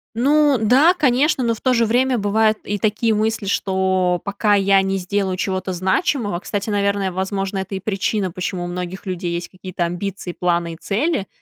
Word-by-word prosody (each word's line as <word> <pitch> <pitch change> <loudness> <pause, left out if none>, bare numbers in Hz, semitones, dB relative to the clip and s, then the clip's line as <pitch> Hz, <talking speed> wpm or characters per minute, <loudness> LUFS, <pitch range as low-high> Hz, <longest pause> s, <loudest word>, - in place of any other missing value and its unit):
Ну 290 +3 +3
да, 265 +10 +5
конечно, 290 -2 +2
но 230 -1 +1
в 220 - -10
то 255 - +2
же 230 -1 +3
время 250 +3 +2
бывают 215 +1 +2
и 205 - -2
такие 215 +2 +1
мысли, 220 0 -1
что 190 -2 +1
пока 205 +1 +1
я 195 -1 +4
не 195 0 -1
сделаю 190 0 -1
чего-то 185 0 -2
значимого, 190 - 0
кстати, 205 +2 -4
наверное, 200 -2 0
возможно, 195 +1 -2
это 190 +1 -4
и - - -3
причина, 195 0 -1
почему 180 0 -4
у - - -4
многих 180 +2 -6
людей 180 -2 -3
есть 170 0 -3
какие-то 185 -1 -4
амбиции, 180 +1 -4
планы 170 -1 -1
и - - -8
цели. 220 - -1
195 Hz, 185 wpm, -20 LUFS, 185-220 Hz, -, да